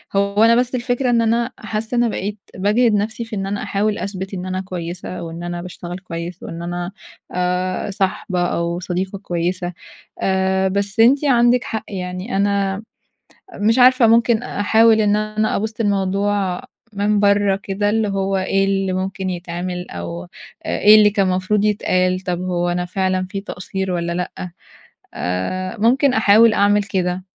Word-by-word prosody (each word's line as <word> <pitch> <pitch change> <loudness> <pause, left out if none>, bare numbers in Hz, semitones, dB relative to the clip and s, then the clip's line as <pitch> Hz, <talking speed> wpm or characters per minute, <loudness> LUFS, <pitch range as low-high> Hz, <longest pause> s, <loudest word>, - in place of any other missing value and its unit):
هو 200 +2 +2
أنا 230 +1 +6
بس 250 +1 +1
الفكرة 245 +1 -1
إن 235 -1 +3
أنا 230 +1 +1
حاسّة 220 +2 -4
أنا 240 0 +3
بقيت 205 0 -4 0.2
باجهِد 210 +5 +2
نفسي 215 +3 -1
في 225 -1 -6
إن 195 - -2
أنا 200 +1 -3
أحاول 205 +1 0
أثبت 190 0 -5
إن 180 -1 -4
أنا 185 0 -2
كويسة، 180 -1 -6
وإن 165 +1 -7
أنا 175 0 -4
باشتغل 175 0 -7
كويس 170 -1 -7
وإن 165 +1 -7
أنا 175 +1 -4 0.4
آآ، 180 +2 -1
صاحبة 190 -1 -1
أو 170 0 -1
صديقة 185 +2 -3
كويسة 175 -1 -2 0.5
آآ، 190 0 +1
بس 200 +2 -2
أنتِ 270 +6 +5
عندك 245 -2 +4
حق 220 - -4
يعني، 185 +3 -5
أنا 200 0 0 0.8
مش 225 +4 +3
عارفة 255 -1 +6
ممكن 230 0 +3
أحاول 220 0 +3
إن 210 -1 +3
أنا 215 0 -1
أبُصّ 220 +2 -4
للموضوع 200 -1 0 0.3
من 205 0 +1
برّه 200 -1 +3
كده، 205 +1 -1
اللي 220 0 +1
هو 195 0 -1
إيه 195 +1 +1
اللي 195 -1 0
ممكن 190 0 -3
يتعمل، 180 0 -5
أو 85 0 -6
إ - - -15 0.4
إيه 210 +1 +5
اللي 210 -1 +7
كان 200 -1 +1
مفروض 185 +3 +1
يتقال، 185 -3 +1
طب 180 -2 -3
هو 175 -1 -1
أنا 175 0 -1
فعلًا 185 0 -1
في 195 - -3
تقصير 190 -1 -4
والَّا 170 -1 -2
لأ، 180 0 -4 0.6
آآ 95 - -3
ممكن 255 +5 +3
أحاول 220 0 +5
أعمل 205 0 +3
كده. 185 -2 -2
195 Hz, 160 wpm, -20 LUFS, 180-215 Hz, 0.8 s, اللي